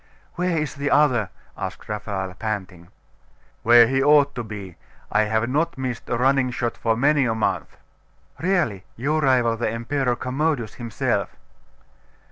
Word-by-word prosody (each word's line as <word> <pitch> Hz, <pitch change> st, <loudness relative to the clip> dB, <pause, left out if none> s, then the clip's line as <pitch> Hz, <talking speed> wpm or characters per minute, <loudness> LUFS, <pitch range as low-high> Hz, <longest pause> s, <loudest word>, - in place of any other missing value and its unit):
'Where 180 Hz, -1 st, -1 dB
is 150 Hz, -2 st, -2 dB
the 145 Hz, 0 st, -2 dB
other?' 130 Hz, -9 st, +3 dB, 0.3 s
asked -, -, -6 dB
Raphael, 100 Hz, -3 st, -4 dB
panting. 90 Hz, -4 st, -5 dB, 0.7 s
'Where 120 Hz, 0 st, +7 dB
he 135 Hz, +3 st, +1 dB
ought 145 Hz, 0 st, +5 dB
to 120 Hz, -, -4 dB
be. 100 Hz, -5 st, -8 dB, 0.4 s
I 105 Hz, +1 st, +3 dB
have 110 Hz, +2 st, 0 dB
not 155 Hz, +5 st, 0 dB
missed 130 Hz, -2 st, -4 dB
a 120 Hz, -, 0 dB
running 130 Hz, +1 st, +2 dB
shot 120 Hz, -1 st, -2 dB
for 115 Hz, -1 st, 0 dB
many 145 Hz, +2 st, +3 dB
a 115 Hz, -2 st, 0 dB
month.' 110 Hz, -, -2 dB, 0.6 s
'Really, 165 Hz, -, 0 dB
you 145 Hz, +6 st, 0 dB
rival 125 Hz, -5 st, +2 dB
the 120 Hz, -, -1 dB
Emperor 125 Hz, +3 st, -1 dB
Commodus 130 Hz, -2 st, -1 dB
himself. 115 Hz, -4 st, -2 dB
120 Hz, 145 wpm, -23 LUFS, 110-145 Hz, 0.7 s, Where